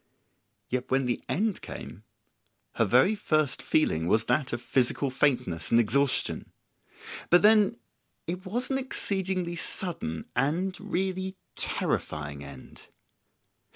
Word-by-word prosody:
Yet 125 0 -3
when 135 0 +2
the 120 -2 -1
end 200 - 0
came - - -9 0.7
her - - +2
very 200 - +4
first 155 -9 0
feeling 80 - +1
was 110 +4 +3
that 130 +3 0
of 120 - -2
physical 130 +2 +1
faintness 125 - 0
and 115 - +5
exhaustion. 130 +4 +1 0.8
But 175 +2 +6
then 210 -1 +5 0.5
it 180 +2 -4
was 245 +8 -2
an 270 - +1
exceedingly 190 -8 -1
sudden 165 - -2
and 165 +9 0
really 190 -1 -2 0.2
terrifying 75 -2 -1
end. 70 -2 -12
155 Hz, 120 wpm, -28 LUFS, 120-190 Hz, 0.8 s, But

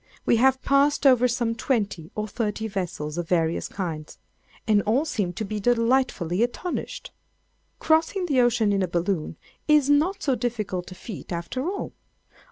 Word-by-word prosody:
We 235 - +4
have 265 +2 +3
passed 280 +1 +3
over 250 -2 +6
some 240 -1 0
twenty 205 - -2
or 215 0 -2
thirty 220 0 -2
vessels 175 -6 -4
of 170 - -5
various 165 -2 +1
kinds, 160 -6 -5 0.5
and 210 -2 +4
all 240 +10 +1
seem 205 - -1
to 215 - -4
be 215 +1 -4
delightfully 230 -5 +1
astonished. 245 +9 -3 0.7
Crossing 325 +4 +2
the 275 -7 +3
ocean 235 -4 +2
in 195 - +1
a 185 - +1
balloon 170 -1 -2 0.3
is 300 -2 +4
not 355 +8 +2
so 275 - +2
difficult 215 -8 -3
a - - -8
feat 205 0 -9
after 215 - -3
all. 400 - -5
225 Hz, 160 wpm, -25 LUFS, 185-265 Hz, 0.7 s, over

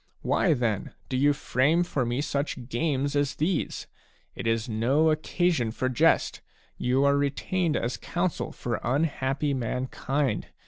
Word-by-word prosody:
Why, 165 -5 +3
then, 115 -6 -2
do 130 - -2
you 145 +3 +4
frame 145 +4 +2
for 140 -8 -1
me 120 +3 0
such 140 -4 -3
games 140 +2 0
as 145 -1 +1
these? 170 +5 -1 0.5
It - - -5
is 115 0 +1
no 130 +8 +2
occasion 155 -4 +1
for 130 +3 -1
jest; 125 - +2 0.3
you 130 +2 +1
are 140 0 +4
retained 150 +4 0
as 120 +2 -2
counsel 175 0 -2
for 120 -2 -3
unhappy 140 +1 0
mankind. 130 +2 -1
140 Hz, 140 wpm, -27 LUFS, 125-150 Hz, 0.5 s, you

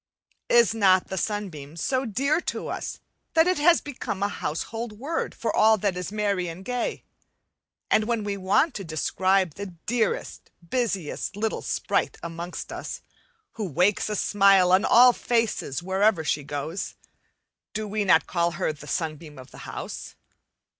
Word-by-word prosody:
Is 235 -2 +5
not 190 -4 +4
the 190 - -3
sunbeam 175 -8 -4
so 260 +10 0
dear 275 - +1
to - - -4
us - - -5 0.4
that 320 0 +6
it 365 -3 +1
has 335 +3 +5
become 225 -8 -4
a 200 - +1
household 225 +8 -4
word 280 +10 -3
for 230 - -2
all 220 0 +5
that 200 -2 0
is 180 +1 -4
merry 200 -4 0
and 170 +3 -8
gay? 250 -1 -2 0.9
and 215 - +4
when 230 -1 -1
we 205 -1 -2
want 200 - +2
to 195 - -5
describe 185 +2 +1
the 190 -1 -7
dearest, 230 -2 -1 0.2
busiest 200 -6 -2
little 220 +2 -2
sprite - - -1
amongst 170 +1 -6
us, - - -6 0.5
who 210 -4 -4
wakes 180 +8 +2
a 210 - -1
smile 195 -3 +4
on 190 +2 +5
all 245 +1 +7
faces 230 - -1
wherever 190 -1 +2
she 150 -1 0
goes, 145 +5 -4 0.8
do 215 0 -3
we 210 +1 -1
not 170 -4 +4
call 170 -1 0
her 155 - -1
the 150 0 -13
"sunbeam 155 -2 -4
of 130 0 -12
the - - -12
house"? - - -7
200 Hz, 160 wpm, -25 LUFS, 170-225 Hz, 0.9 s, all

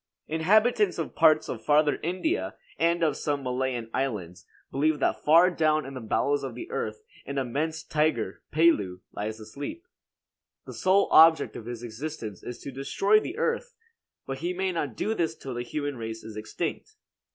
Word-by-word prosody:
Inhabitants 210 +6 +3
of 165 - -3
parts 155 -1 +4
of 115 -2 -5
Farther 150 0 +3
India 185 - -1 0.2
and 170 0 +2
of 150 -3 +2
some 145 -1 -2
Malayan 125 -2 -2
islands 95 -9 -3 0.2
believe 150 +3 +2
that 140 - 0
far 170 +4 +6
down 155 -2 +2
in 135 - -7
the 130 - -6
bowels 140 +6 +1
of 135 - -5
the 340 - -8
earth 445 - -3 0.2
an 140 - -4
immense 150 +5 -2
tiger, 150 -11 0
Pelu, 105 - +3
lies 110 +2 -4
asleep. 140 - -7 0.8
The - - -8
sole 190 +2 +3
object 160 0 +6
of 115 - -8
his 120 -1 -6
existence 115 - -6
is 120 - -7
to 140 - -6
destroy 195 +10 +2
the 335 - -6
earth; 475 +1 -1 0.5
but 135 0 -5
he 175 +2 -2
may 190 0 0
not 145 -9 -3
do 220 - 0
this 165 -6 -1
till 135 -4 -7
the 120 - -3
human 145 +2 -3
race 115 -1 -6
is 110 -1 -9
extinct. 160 - -5
150 Hz, 175 wpm, -27 LUFS, 120-170 Hz, 0.8 s, far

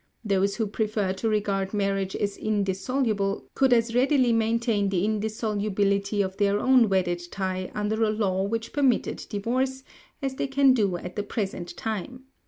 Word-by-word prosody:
Those 200 -1 +1
who 225 - 0
prefer 210 -2 -1
to 210 +4 -2
regard 200 -2 -1
marriage 195 -1 -1
as 200 -1 -1
indissoluble 200 +1 -1
could 265 -1 +3
as 230 -1 +3
readily 255 -1 +3
maintain 225 -2 +1
the 190 -1 +1
indissolubility 205 -2 0
of 190 0 -5
their 205 0 +2
own 255 -3 +4
wedded 180 -2 +1
tie 185 -1 -3
under 210 +1 -1
a 220 - +3
law 200 -3 0
which 225 +3 -3
permitted 275 -4 +1
divorce, 255 +5 -1 0.4
as 270 -1 -2
they 270 - -2
can 270 -1 +4
do 200 -7 +1
at 180 +1 -8
the 205 - -1
present 195 -4 -4
time. 225 +4 -4
210 Hz, 160 wpm, -26 LUFS, 195-230 Hz, 0.4 s, own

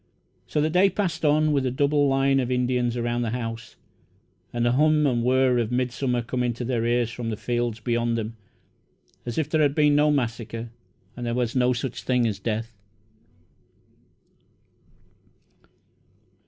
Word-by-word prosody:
So 150 - 0
the 155 +1 +1
day 185 +3 +4
passed 195 -5 -2
on, 155 0 +3
with 140 -2 +1
a 130 - 0
double 145 +2 +2
line 135 0 +2
of 125 -2 -1
Indians 125 -1 0
around 120 0 -1
the 115 - -1
house, 115 -1 -5 0.8
and 120 0 -1
the 120 - +3
hum 150 +3 +3
and 120 -4 +1
whir 130 0 +3
of 115 -1 -1
midsummer 125 0 -1
coming 125 0 -1
to 120 +2 -5
their 120 -2 -1
ears 120 -1 +1
from 120 -1 -5
the 110 - -3
fields 120 -1 -2
beyond 115 +1 0
them, 115 0 -4 0.9
as 120 - -4
if 160 -3 0
there 155 0 +1
had 145 -1 +2
been 150 -1 +4
no 150 +1 +4
massacre 115 -4 -2 0.4
and 120 - -7
there 120 0 -2
was 120 -1 -1
no 125 -1 +3
such 125 0 -3
thing 125 -2 +1
as 105 -3 -2
death. 115 +2 -3
125 Hz, 165 wpm, -25 LUFS, 120-140 Hz, 0.9 s, day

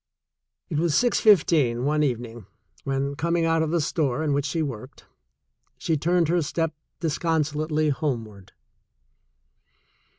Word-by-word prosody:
It 155 -5 -2
was 165 -3 +1
six 245 -1 +3
fifteen 150 - +3
one 150 +1 +1
evening 120 -6 -3 0.4
when, 135 +1 -1
coming 170 +2 0
out 165 0 +2
of 160 - 0
the 170 +1 +1
store 150 -2 -1
in 150 -2 0
which 140 0 0
she 160 +3 -1
worked, 130 -2 -7 0.7
she 160 - -1
turned 170 +2 +1
her 175 +2 +2
step 165 +1 -1 0.3
152 165 - 0
THE - - +1
SECOND 160 0 +1
CHOICE - - -5
disconsolately 155 +1 0
homeward. 115 - -4
150 Hz, 155 wpm, -25 LUFS, 135-165 Hz, 0.7 s, six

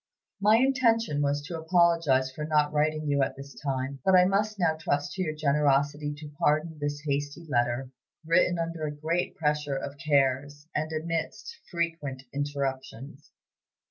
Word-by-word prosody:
My 210 +2 +5
intention 230 - +2
was 145 0 0
to 165 +2 -5
apologize 160 -6 +3
for 150 +3 -6
not 150 -1 +2
writing 155 +1 +1
you 140 -1 +2
at 135 - 0
this 140 0 -10
time; 135 -1 -3
but 190 - +4
I 180 0 +7
must 205 +3 +1
now 170 -4 +2
trust 145 -2 -1
to 190 - -3
your 155 -4 -2
generosity 145 0 +1
to 150 -1 -9
pardon 155 +1 +1
this 145 0 -3
hasty 145 +3 -2
letter, 120 0 0 0.3
written 175 +1 +3
under 165 -2 -3
a - - -3
great 165 +4 -1
pressure 150 -2 0
of 140 +1 -6
cares 145 -1 +1
and 155 +1 -2
amidst 165 - -3
frequent 165 -6 -3
interruptions. 140 0 -4
150 Hz, 155 wpm, -28 LUFS, 140-165 Hz, 0.3 s, I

